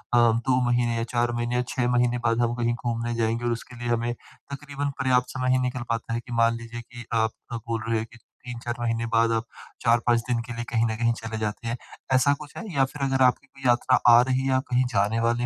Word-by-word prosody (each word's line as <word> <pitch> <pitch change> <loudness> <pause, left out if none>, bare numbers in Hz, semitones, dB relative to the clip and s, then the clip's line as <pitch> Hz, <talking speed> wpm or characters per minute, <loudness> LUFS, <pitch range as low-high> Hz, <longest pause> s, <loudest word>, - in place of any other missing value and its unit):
2 120 +2 +3
महीने 120 -1 +1
या 115 - 0
4 120 0 +2
महीने 120 +1 -1
या 125 - +2
6 125 -2 0
महीने 125 0 +2
बाद 115 0 +2
हम 120 0 +1
कहीं 120 -1 0
घूमने 120 0 -2
जाएँगे 115 +1 0
और 120 - +1
उसके 120 +1 -5
लिए 120 - -4
हमें 120 0 0
तकरीबन 140 +3 -7
पर्याप्त 125 -1 +2
समय 130 0 +1
ही 130 - +3
निकल 125 -1 -2
पाता 115 0 -2
है 115 - 0
कि 120 - -12
मान 115 0 +4
लीजिए 115 0 -8
कि 120 0 -11
आप 110 -1 +2 0.2
आप 115 - -4
बोल 115 -1 -1
रहे 115 -1 +2
हो 110 - -3
कि 120 - -14 0.3
3-4 120 -1 -5
महीने 115 -1 -1
बाद 115 0 +4
आप 115 0 0 0.4
4-5 120 0 +3
दिन 120 -1 +1
के 120 - -5
लिए 120 - -3
कहीं 115 -1 +2
न - - -2
कहीं 115 0 +3
चले 110 0 -4
जाते 110 +2 -3
हैं। 115 +1 -2 0.4
ऐसा 130 +2 +4
कुछ 150 -1 -11
है - - -5
या 135 -1 +4
फिर 140 +2 -10
अगर 135 0 0
आपकी 125 +2 +1
कोई 135 -1 -6
यात्रा 120 +1 +4 0.2
आ 120 - +7
रही 130 0 +1
है 135 - -2
या 130 0 +3
कहीं 125 +1 +3
जाने 105 +3 +2
वाले 120 +1 +1
120 Hz, 250 wpm, -25 LUFS, 115-125 Hz, 0.4 s, आ